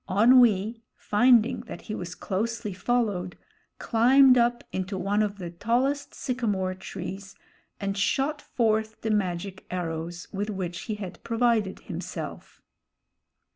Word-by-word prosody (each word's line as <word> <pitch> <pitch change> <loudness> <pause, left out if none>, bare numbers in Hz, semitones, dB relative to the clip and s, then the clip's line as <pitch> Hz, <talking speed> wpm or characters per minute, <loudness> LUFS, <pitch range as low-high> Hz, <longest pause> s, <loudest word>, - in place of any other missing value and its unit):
Onwee, 225 0 +5
finding 240 +2 +4
that - - -7
he 215 - -6
was 180 -3 -5
closely 215 +1 -3
followed, 195 -4 -1 0.4
climbed 255 +3 +5
up 240 0 +2
into 190 +1 -3
one 200 +3 +1
of 205 -1 -1
the 175 -3 -6
tallest 250 +10 0
sycamore 210 -8 -1
trees 190 +1 -7 0.4
and 195 -1 -2
shot 275 +8 0
forth 220 -2 0
the 220 - -1
magic 190 -2 -2
arrows 170 -1 -4
with 205 +2 -2
which 180 -3 -4
he 215 - 0
had 195 -4 -8
provided 230 -4 +1
himself. - - -7
210 Hz, 125 wpm, -27 LUFS, 185-235 Hz, 0.4 s, Onwee